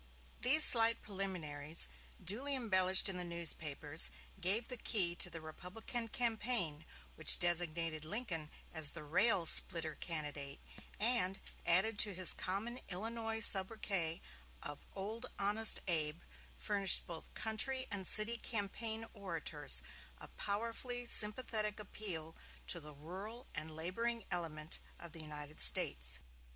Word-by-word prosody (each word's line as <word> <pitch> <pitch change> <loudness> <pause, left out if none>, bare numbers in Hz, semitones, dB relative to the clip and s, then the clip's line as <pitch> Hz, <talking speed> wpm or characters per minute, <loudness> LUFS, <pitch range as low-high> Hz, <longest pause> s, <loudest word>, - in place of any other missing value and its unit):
These 300 +5 +5
slight 230 -1 +6
preliminaries, 170 -7 -3 0.4
duly 250 - -2
embellished 190 -7 +1
in 190 -2 -1
the 180 - -6
newspapers, 160 - +1 0.3
gave 205 +6 +1
the 250 - -4
key 190 -7 0
to - - +2
the 165 -1 -9
Republican 215 +9 -4
campaign, 220 -9 0 0.3
which - - +4
designated 165 -2 0
Lincoln 170 -4 -4 0.2
as 160 -3 +3
the 170 - -9
Rail 175 +4 +1
splitter 165 -1 +4
Candidate, 145 -3 -7 0.4
and, 210 -4 0 0.3
added 200 +5 +1
to 205 -3 +6
his 185 -1 +6
common 220 +7 -6
Illinois 225 +3 -5
sobriquet 190 -5 +2 0.4
of 145 - -10
"Honest 210 +1 +1
Old - - -24
Abe," 160 -1 -2 0.4
furnished 200 -3 +4
both 165 -2 -11
country 260 +4 -1
and 195 -3 -2
city 220 +2 +10
campaign 225 +1 -4
orators 165 - -2 0.3
a - - -13
powerfully 230 +4 -5
sympathetic 215 -1 -1
appeal 180 -6 -4 0.3
to 170 - 0
the 150 -2 -13
rural 195 - -10
and 155 0 -7
laboring 230 +8 -5
element 160 -3 -5 0.2
of 170 - -13
the 165 0 -6
United 150 0 -11
States. - - +4
190 Hz, 125 wpm, -34 LUFS, 160-225 Hz, 0.4 s, city